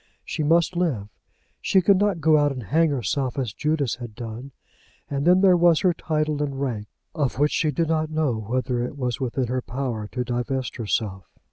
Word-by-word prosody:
She -, -, -3 dB
must 165 Hz, +3 st, +3 dB
live. 140 Hz, -, -1 dB, 0.5 s
She 190 Hz, -, +3 dB
could 190 Hz, +1 st, +4 dB
not 200 Hz, -5 st, +1 dB
go 155 Hz, 0 st, +5 dB
out 145 Hz, -1 st, +3 dB
and 130 Hz, -3 st, -5 dB
hang 160 Hz, -, +2 dB
herself 135 Hz, 0 st, -1 dB
as 125 Hz, -6 st, -2 dB
Judas 150 Hz, -4 st, -1 dB
had 120 Hz, -3 st, -8 dB
done. 120 Hz, +3 st, -7 dB, 0.6 s
And 140 Hz, +3 st, -1 dB
then 180 Hz, +1 st, +6 dB
there 190 Hz, -2 st, +6 dB
was 170 Hz, -2 st, +4 dB
her 185 Hz, -2 st, +3 dB
title 155 Hz, -2 st, -1 dB
and 140 Hz, -2 st, -2 dB
rank, 115 Hz, -7 st, -3 dB, 0.3 s
of 145 Hz, -7 st, -1 dB
which 145 Hz, +2 st, +2 dB
she 155 Hz, -, +1 dB
did 160 Hz, +2 st, 0 dB
not 155 Hz, -1 st, +1 dB
know 155 Hz, -6 st, 0 dB
whether 120 Hz, +3 st, -2 dB
it 125 Hz, +4 st, -4 dB
was 125 Hz, -4 st, -2 dB
within 130 Hz, 0 st, -1 dB
her 125 Hz, +2 st, -2 dB
power 120 Hz, -4 st, -4 dB
to 125 Hz, +3 st, -3 dB
divest 125 Hz, +1 st, -3 dB
herself. 100 Hz, -4 st, -2 dB
140 Hz, 200 wpm, -24 LUFS, 120-155 Hz, 0.6 s, then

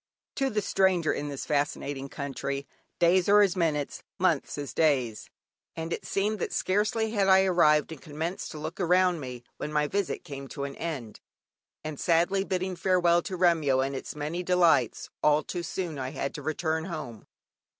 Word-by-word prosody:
(Kipling.) 270 Hz, -1 st, 0 dB
To 215 Hz, -, -9 dB
the 210 Hz, -, +2 dB
stranger 185 Hz, -5 st, +2 dB
in 145 Hz, -, -3 dB
this 140 Hz, -2 st, -5 dB
fascinating 145 Hz, -1 st, -2 dB
country, 140 Hz, 0 st, -4 dB, 0.3 s
days 175 Hz, +2 st, +3 dB
are 205 Hz, +1 st, +7 dB
as 200 Hz, -3 st, +3 dB
minutes, 155 Hz, -5 st, -1 dB, 0.2 s
months -, -, +1 dB
as 145 Hz, -5 st, -5 dB
days, 130 Hz, -9 st, +1 dB, 0.5 s
and 165 Hz, +1 st, -3 dB
it -, -, -5 dB
seemed 210 Hz, +2 st, 0 dB
that -, -, -2 dB
scarcely 210 Hz, +3 st, 0 dB
had 200 Hz, -3 st, +1 dB
I 190 Hz, 0 st, +6 dB
arrived 155 Hz, -5 st, +4 dB
and 160 Hz, -, -8 dB
commenced 160 Hz, +4 st, -4 dB
to -, -, -7 dB
look 150 Hz, -, -6 dB
around 180 Hz, -1 st, +3 dB
me, 125 Hz, -3 st, -7 dB
when 150 Hz, -, -4 dB
my 150 Hz, -1 st, +2 dB
visit 195 Hz, +4 st, -2 dB
came 140 Hz, -5 st, -7 dB
to 140 Hz, -, -6 dB
an 140 Hz, 0 st, -5 dB
end, 145 Hz, -10 st, -5 dB, 0.6 s
and 155 Hz, -2 st, -6 dB
sadly 175 Hz, +3 st, +2 dB
bidding 185 Hz, -1 st, -2 dB
farewell 175 Hz, -2 st, +3 dB
to 185 Hz, +1 st, -5 dB
Remyo 160 Hz, -7 st, +3 dB
and 135 Hz, 0 st, -3 dB
its 135 Hz, -, -6 dB
many 150 Hz, +4 st, -3 dB
delights, 170 Hz, -9 st, +2 dB
all 150 Hz, 0 st, +4 dB
too 175 Hz, -, -4 dB
soon 170 Hz, -4 st, -4 dB
I 130 Hz, -1 st, -3 dB
had 140 Hz, 0 st, -4 dB
to 150 Hz, -, -6 dB
return 160 Hz, +2 st, -1 dB
home. 150 Hz, -, -7 dB
160 Hz, 180 wpm, -28 LUFS, 145-185 Hz, 0.6 s, are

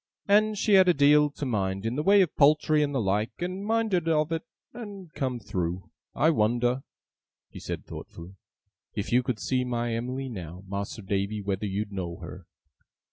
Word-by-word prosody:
And 210 Hz, +1 st, +4 dB
she 210 Hz, -, +2 dB
had 190 Hz, -1 st, +7 dB
a 180 Hz, -, +4 dB
deal 145 Hz, +1 st, +5 dB
to 145 Hz, 0 st, -6 dB
mind 95 Hz, -4 st, -1 dB
in 115 Hz, +2 st, -1 dB
the 150 Hz, -, 0 dB
way 195 Hz, +4 st, +6 dB
of 175 Hz, -, -4 dB
poultry 150 Hz, +1 st, +4 dB
and 145 Hz, -1 st, +1 dB
the 135 Hz, -, 0 dB
like, 105 Hz, +1 st, 0 dB
and 185 Hz, +3 st, -3 dB
minded 215 Hz, -6 st, +1 dB
of 155 Hz, 0 st, +2 dB
it, 165 Hz, -1 st, -1 dB, 0.3 s
and 200 Hz, -8 st, -9 dB
come 130 Hz, -4 st, -2 dB
through. 90 Hz, -3 st, -4 dB, 0.2 s
I 160 Hz, +3 st, +4 dB
wonder,' 120 Hz, 0 st, +1 dB, 0.7 s
he -, -, -9 dB
said -, -, -5 dB
thoughtfully, 85 Hz, +3 st, -10 dB, 0.6 s
'if 105 Hz, +3 st, -3 dB
you 125 Hz, +1 st, +5 dB
could 125 Hz, -4 st, -3 dB
see 125 Hz, +6 st, 0 dB
my 120 Hz, -1 st, -2 dB
Em'ly 125 Hz, +4 st, -3 dB
now, 90 Hz, -6 st, -7 dB
Mas'r 100 Hz, +2 st, -5 dB
Davy, 100 Hz, +2 st, -1 dB
whether 100 Hz, +1 st, -2 dB
you'd 100 Hz, +2 st, -3 dB
know 90 Hz, -3 st, -4 dB
her! 85 Hz, +1 st, -10 dB
125 Hz, 185 wpm, -27 LUFS, 100-155 Hz, 0.7 s, had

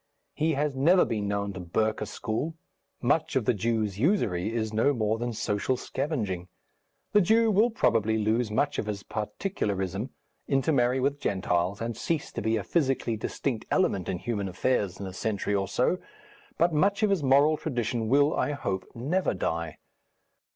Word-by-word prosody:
He 160 Hz, +1 st, +1 dB
has 145 Hz, 0 st, 0 dB
never 170 Hz, +7 st, +5 dB
been 105 Hz, -2 st, -2 dB
known 100 Hz, 0 st, -1 dB
to 95 Hz, -, -7 dB
burke 110 Hz, +5 st, -1 dB
a -, -, -2 dB
school. 130 Hz, +9 st, -3 dB, 0.5 s
Much 150 Hz, +4 st, +1 dB
of 130 Hz, -5 st, +1 dB
the -, -, +3 dB
Jew's 110 Hz, -2 st, -1 dB
usury 110 Hz, -, +1 dB
is 110 Hz, -2 st, -2 dB
no 115 Hz, +7 st, +3 dB
more 110 Hz, -1 st, 0 dB
than 120 Hz, 0 st, -2 dB
social 105 Hz, +3 st, -1 dB
scavenging. 110 Hz, -, -3 dB, 0.6 s
The 210 Hz, -, +5 dB
Jew 225 Hz, +4 st, +4 dB
will 215 Hz, +4 st, +4 dB
probably 115 Hz, -, +2 dB
lose 110 Hz, +2 st, +1 dB
much 145 Hz, +7 st, 0 dB
of 105 Hz, -, -3 dB
his 100 Hz, -2 st, -4 dB
particularism, 105 Hz, -, -3 dB, 0.4 s
intermarry 130 Hz, -2 st, +2 dB
with 140 Hz, +2 st, 0 dB
Gentiles, 95 Hz, -1 st, 0 dB
and 115 Hz, 0 st, -2 dB
cease 160 Hz, +5 st, -2 dB
to -, -, -4 dB
be 110 Hz, 0 st, +1 dB
a 105 Hz, -, -3 dB
physically 130 Hz, -, 0 dB
distinct 115 Hz, +2 st, -3 dB
element 100 Hz, -, +1 dB
in 90 Hz, -, -1 dB
human 100 Hz, -1 st, -3 dB
affairs 95 Hz, 0 st, 0 dB
in 100 Hz, -, -5 dB
a 95 Hz, -, -6 dB
century 105 Hz, +1 st, -2 dB
or 100 Hz, -1 st, +1 dB
so. 125 Hz, -, +1 dB, 0.6 s
But 170 Hz, 0 st, +3 dB
much 200 Hz, +8 st, +2 dB
of 210 Hz, -, +3 dB
his 195 Hz, -5 st, +2 dB
moral 140 Hz, +3 st, +5 dB
tradition 120 Hz, -6 st, -2 dB
will, 145 Hz, +3 st, +4 dB
I 145 Hz, -, 0 dB
hope, 95 Hz, -9 st, -3 dB
never 150 Hz, -, 0 dB
die.... 85 Hz, -3 st, -2 dB
115 Hz, 170 wpm, -28 LUFS, 100-145 Hz, 0.6 s, never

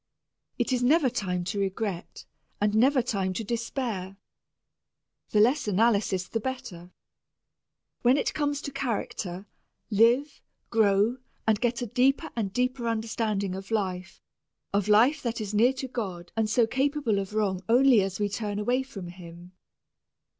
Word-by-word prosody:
It 245 Hz, +1 st, 0 dB
is 250 Hz, -, +1 dB
never 270 Hz, +1 st, +4 dB
time 180 Hz, -4 st, -2 dB
to 200 Hz, +3 st, -3 dB
regret 195 Hz, -2 st, -3 dB, 0.3 s
and 210 Hz, 0 st, +1 dB
never 255 Hz, +4 st, +4 dB
time 195 Hz, -6 st, -1 dB
to 225 Hz, -, -3 dB
despair. 225 Hz, -4 st, -3 dB, 1.1 s
The 210 Hz, -, +2 dB
less 245 Hz, +5 st, +3 dB
analysis 200 Hz, -3 st, +2 dB
the 225 Hz, -, -2 dB
better. 220 Hz, -9 st, -6 dB, 1.1 s
When 250 Hz, +3 st, +4 dB
it -, -, 0 dB
comes 290 Hz, -1 st, -1 dB
to 280 Hz, -, -4 dB
character, 210 Hz, -8 st, -3 dB, 0.5 s
live, 240 Hz, +7 st, +3 dB, 0.3 s
grow, 215 Hz, +1 st, +3 dB, 0.3 s
and 220 Hz, -2 st, +2 dB
get 240 Hz, 0 st, 0 dB
a -, -, -1 dB
deeper 255 Hz, +5 st, +1 dB
and 210 Hz, -5 st, -2 dB
deeper 250 Hz, +2 st, -1 dB
understanding 220 Hz, -3 st, -1 dB
of 190 Hz, +1 st, -7 dB
life 190 Hz, -4 st, -3 dB, 0.5 s
of 200 Hz, 0 st, +1 dB
life 240 Hz, +8 st, +4 dB
that 235 Hz, -2 st, -3 dB
is 210 Hz, -1 st, -4 dB
near 235 Hz, +5 st, +4 dB
to 265 Hz, 0 st, -5 dB
God 190 Hz, -9 st, -5 dB
and 220 Hz, -1 st, 0 dB
so 235 Hz, +1 st, +4 dB
capable 265 Hz, -3 st, 0 dB
of 195 Hz, +2 st, -5 dB
wrong 195 Hz, -4 st, 0 dB
only 245 Hz, -1 st, +6 dB
as 195 Hz, 0 st, -3 dB
we 205 Hz, -, +1 dB
turn 205 Hz, 0 st, -3 dB
away 245 Hz, +5 st, +1 dB
from 215 Hz, -9 st, -8 dB
Him. 175 Hz, 0 st, -12 dB
220 Hz, 150 wpm, -27 LUFS, 195-250 Hz, 1.1 s, only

